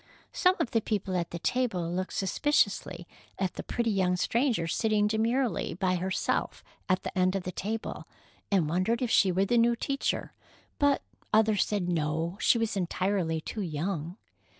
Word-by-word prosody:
Some 365 0 +3
of - - -1
the 225 - +2
people 200 -3 -2
at 170 -2 -1
the 170 - -5
table 185 -5 -1
looked 185 +1 -3
suspiciously 195 -5 0 0.3
at 190 -2 -1
the - - -5
pretty 235 -2 -1
young 185 -2 +2
stranger 230 -1 +1
sitting 210 +4 +1
demurely 225 +1 0
by 185 0 +1
herself 185 +1 -1 0.3
at 185 0 +2
the - - -5
end 185 0 +2
of 195 - -2
the 185 - -4
table, 215 +4 -4 0.4
and 185 -6 +2
wondered 185 +10 0
if 240 - -1
she 190 - +5
were 190 +2 +2
the 240 +4 +3
new 235 +1 +4
teacher, 275 +3 -2 0.5
but 285 -1 +3 0.3
others 215 -1 +4
said 200 -4 -2
no, 165 +1 -1
she - - +4
was 225 -2 -1
entirely 180 -3 0
too 215 - -5
young. 170 +1 -3
195 Hz, 170 wpm, -29 LUFS, 180-225 Hz, 0.5 s, she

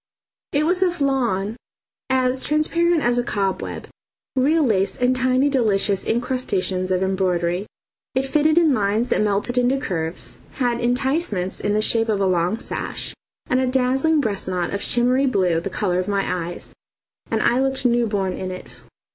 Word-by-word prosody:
It 295 +1 +1
was 360 +3 +1
of 355 -3 +1
lawn 235 -7 0 0.5
as 260 0 +1
transparent 330 +2 +2
as 240 0 +2
a - - 0
cobweb, 195 -4 -3 0.5
real 300 +5 +3
lace 200 -7 +1
and 250 +1 +2
tiny 255 +2 +2
delicious 210 -7 +1
incrustations 205 -6 -1
of 185 0 +1
embroidery. 185 0 0 0.5
It 260 +1 +1
fitted 310 +3 +2
in 325 -4 +5
lines 215 +2 0
that - - +2
melted 210 +4 +1
into 250 +2 +2
curves, 165 -8 -3
had 245 -3 -1
enticements 245 - 0
in 205 - 0
the 215 +1 +1
shape 225 0 +1
of 210 -2 +1
a 195 - +2
long 180 +2 +1
sash - - -4 0.3
and 255 - +1
a 260 - +1
dazzling 265 +5 +2
breast 210 -6 -2
knot 180 -1 -2
of 200 - -2
shimmery 250 +3 +2
blue, 185 -8 +2
the 185 - -5
colour 185 -3 -1
of 185 - -2
my 195 -4 -1
eyes, 175 - -10 0.6
and 225 -1 0
I 240 +2 +3
looked 265 -1 0
new 240 -1 +3
born 195 -3 -1
in 185 - -5
it. 185 0 -9
235 Hz, 170 wpm, -22 LUFS, 195-265 Hz, 0.6 s, in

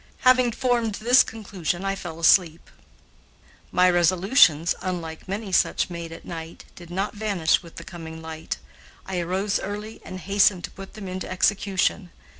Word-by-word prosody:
Having 255 -2 +4
formed 240 -4 0
this 245 +5 +5
conclusion 195 -5 -3
I 195 - 0
fell 175 -4 -7
asleep. 165 -1 +3 1.0
My 180 0 +4
resolutions, 175 - +4
unlike 170 -3 -5
many 200 +1 -4
such 180 - +2
made 170 -1 -6
at 165 - -10
night, 165 -1 -8
did 175 -1 -13
not 195 +4 -2
vanish 200 -7 +1
with 170 -2 -14
the - - -8
coming 160 -2 -9
light. 160 0 -6 0.5
I 190 -2 -3
arose 190 +4 -1
early 210 +2 -6
and 185 - -8
hastened 195 -1 +3
to - - -6
put 195 0 -11
them 210 -3 -7
into 185 0 -5
execution. 190 -1 +1
185 Hz, 155 wpm, -24 LUFS, 170-205 Hz, 1.0 s, this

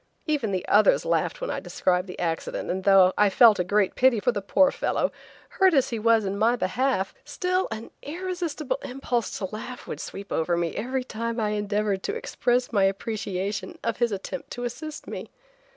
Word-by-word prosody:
Even 290 -9 0
the 185 -1 -2
others 210 0 +4
laughed - - 0
when - - -2
I - - -2
described 180 +1 0
the 180 - -8
accident, 165 -2 -2
and, 190 +2 -4
although 190 -1 +7
I 210 -1 +6
felt 220 +1 +6
a - - +3
great 200 +1 +1
pity 255 -3 +4
for 245 - +2
the 205 -4 -3
poor 275 +8 +4
fellow, - - 0 0.4
hurt 380 -3 +3
as 270 -3 +3
he 230 - -2
was 225 -1 +3
in 195 +1 -2
my 230 +3 +4
behalf, 235 -1 0
still 365 +1 -1
an 225 0 -7
irresistible 325 -5 -3
impulse 250 -3 -2
to 195 - -3
laugh 245 +3 -7
would - - -6
sweep 200 +1 -8
over 170 +2 +1
me 170 -1 -1
every 255 +4 -2
time 230 -1 -4
I 215 -1 +1
endeavored 205 -1 -1
to 420 - -3
express 250 - 0
my 200 -3 +4
appreciation 200 -1 -3
of 230 -1 -1
his 240 -1 +1
attempt 200 +7 -5
to 245 - -5
assist 300 +6 -6
me. - - -7
225 Hz, 195 wpm, -26 LUFS, 195-260 Hz, 0.4 s, although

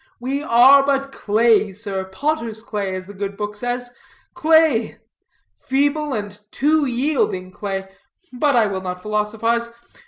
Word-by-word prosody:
We 265 +4 -2
are 270 +1 +6
but 275 0 0
clay, 215 -3 +2
sir, 195 -2 -5
potter's 225 +1 -3
clay, 200 -4 -3
as 185 0 -6
the 205 - -11
good 200 0 -5
book 210 0 -4
says, 245 +2 -3 0.4
clay, 315 -8 +3 0.6
feeble, 290 +2 0
and 205 -2 -5
too 300 +4 +2
yielding 245 -8 -1
clay. 195 0 -5 0.5
But 280 +2 +1
I 230 -2 +4
will 195 -2 -3
not 180 -1 -5
philosophize. 225 +2 -1
230 Hz, 135 wpm, -20 LUFS, 205-275 Hz, 0.6 s, are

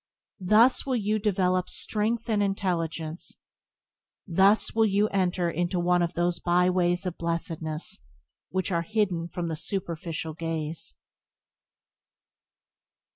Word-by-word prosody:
Thus 215 +7 +4
will 265 -2 -1
you 215 -1 0
develop 185 -3 +1
strength 225 +2 -1
and 215 -3 +1
intelligence; 170 -5 -2 0.9
thus 195 +4 +3
will 225 0 +4
you 205 +1 +2
enter 180 -3 0 0.2
one 175 0 +2
of 170 0 -1
those 175 0 0
byways 180 +1 +2
of 180 -2 -4
blessedness 165 - -3 0.5
which 185 +1 -2
are 170 -1 +1
hidden 180 -3 -1
from 175 0 -4
the 160 - -2
superficial 165 -2 -4
gaze. 160 - -4
180 Hz, 110 wpm, -27 LUFS, 170-200 Hz, 0.9 s, Thus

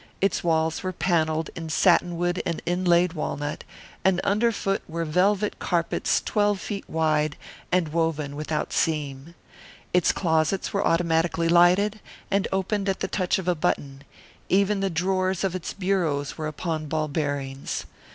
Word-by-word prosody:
Its 195 -1 +1
walls 160 -1 +1
were 185 - -2
panelled 160 -3 0
in 165 -1 -6
satinwood 175 +1 +2
and 170 - -2
inlaid 175 -1 +2
walnut, 150 -2 -3 0.4
and 190 -1 +3
under 215 +4 +2
foot 195 -2 -1
were 165 +1 -2
velvet 195 +6 +1
carpets 170 -2 +1
twelve 205 -2 +1
feet 200 0 -6
wide 155 -2 +1 0.4
and 180 -3 +2
woven 155 -3 -1
without 150 +1 -3
seam. 150 0 -1 0.6
Its 180 -1 +4
closets 160 +1 0
were 200 - +1
automatically 165 0 +1
lighted, 180 +5 +4 0.3
and 200 0 +2
opened 195 +1 0
at 190 - -1
the - - 0
touch 185 -2 0
of 190 -2 -5
a 180 - +4
button; 140 -3 -2 0.5
even 200 +1 +3
the 195 0 0
drawers 185 +2 0
of 190 -2 0
its 185 -2 -4
bureaus 175 -8 -1
were 155 -1 -4
upon 155 0 -3
ball 155 0 -1
bearings. 140 -2 -3
170 Hz, 150 wpm, -25 LUFS, 155-190 Hz, 0.6 s, Its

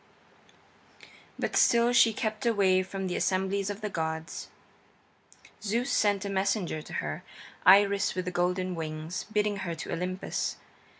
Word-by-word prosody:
IV - - -18 0.3
But - - -2
still 235 +1 +4
she 235 -1 +6
kept 215 0 -3
away 195 -4 +3
from 190 +1 -5
the 180 -1 -2
assemblies 190 +1 0
of 205 +1 -5
the 210 - -2
gods. 160 -1 -4 1.1
Zeus 230 +5 -1
sent 205 -1 +2
a - - -2
messenger 190 -4 0
to - - -11
her, 75 0 -3 0.5
Iris 200 +1 +5
with 185 -1 -2
the 180 - -2
golden 180 +1 0
wings, 160 +1 -5
bidding 210 -1 +1
her 180 -3 -4
to 165 - -5
Olympus. 180 +2 -2
190 Hz, 145 wpm, -29 LUFS, 180-205 Hz, 1.1 s, she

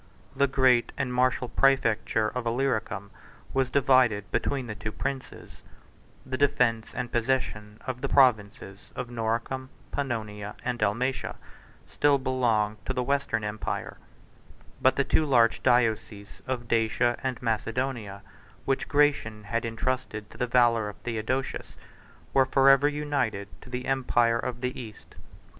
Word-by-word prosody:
The 140 +1 +3
great 130 -3 +3
and 125 -2 -2
martial 125 0 +1
præfecture 115 -4 +2
of 125 -2 -2
Illyricum 115 -5 -1 0.4
was 135 -1 +1
divided 125 -6 +3
between 135 -3 -1
the 110 - -5
two 110 +1 -5
princes: 135 +4 -6 0.6
the 130 0 -4
defence 125 -6 +2
and 125 -1 -3
possession 115 -4 -1
of 125 -1 -4
the - - -2
provinces 110 -6 +2 0.2
of 120 - -5
Noricum, 120 +3 -2 0.2
Pannonia, 105 -6 -4
and 120 -1 -2
Dalmatia 125 +6 -1 0.5
still 145 -1 +3
belonged 115 -6 0
to 130 - 0
the 125 -1 -1
Western 140 -5 0
empire; 105 +1 -4 0.8
but 130 - +4
the 140 - +2
two 150 - +2
large 120 -6 +3
dioceses 110 -4 0
of 125 -2 -3
Dacia 115 +1 +1
and 130 -2 -2
Macedonia, 115 -2 -2 0.4
which 135 -1 0
Gratian 145 -8 +1
had 115 +3 -2
intrusted 115 -2 -3
to - - -13
the 125 - 0
valor 120 -3 +3
of 105 - -9
Theodosius, 120 +3 -3 0.6
were 135 -1 +4
forever 135 +1 +5
united 145 -9 -1
to - - -13
the 125 0 -4
empire 120 -3 +2
of 120 0 -4
the 125 0 -3
East. 110 -3 -12
125 Hz, 135 wpm, -27 LUFS, 110-130 Hz, 0.8 s, forever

